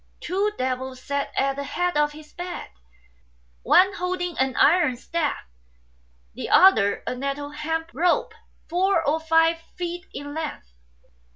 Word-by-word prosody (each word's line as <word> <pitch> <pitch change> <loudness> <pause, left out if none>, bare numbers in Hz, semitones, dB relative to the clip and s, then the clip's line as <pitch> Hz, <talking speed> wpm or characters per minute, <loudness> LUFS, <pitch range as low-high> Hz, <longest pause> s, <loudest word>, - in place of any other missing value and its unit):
Two 395 +4 0
devils 255 0 -3
sat 280 +2 -3
at 275 0 +1
the 280 - -3
head 355 +4 -1
of 295 0 +2
his 300 0 -14
bed, 355 0 -6 0.9
one 380 - +5
holding 360 -2 -3
an 265 -1 +1
iron 300 -6 +4
staff, 315 +4 -2 0.9
the - - -6
other 285 - +5
a - - -2
nettle 275 +3 -4
hemp 325 +2 -3
rope 360 +8 +1 0.3
four 360 -1 +1
or 310 +3 +2
five 325 +1 +3 0.2
feet 350 0 -5
in 285 0 -7
length. 300 - -6
320 Hz, 135 wpm, -24 LUFS, 280-355 Hz, 0.9 s, one